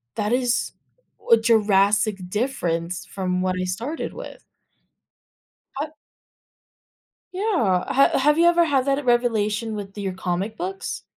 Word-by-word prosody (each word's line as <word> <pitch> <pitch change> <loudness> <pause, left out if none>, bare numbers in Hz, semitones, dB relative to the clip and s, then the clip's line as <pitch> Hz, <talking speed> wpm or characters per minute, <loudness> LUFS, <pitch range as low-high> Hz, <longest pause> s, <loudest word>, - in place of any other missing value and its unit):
"That 210 +1 -1
is 245 -1 0 0.6
a 230 - +9
drastic 210 -3 +2
difference 180 -7 -2
from 185 -2 -2
what 185 0 0
I - - -1
started 225 - -4
with." - - -9 1.4
Up 310 +1 -6 1.4
Yeah, 360 - 0
h 275 +1 +3
have 300 +3 +3
you 340 - +5
ever 345 0 +4
had 280 -4 +2
that 280 +1 0
revelation 225 -2 +1
with 195 -1 -8
your 195 -2 -3
comic 185 +4 -3
books? 190 +2 -5
215 Hz, 125 wpm, -23 LUFS, 190-265 Hz, 1.4 s, a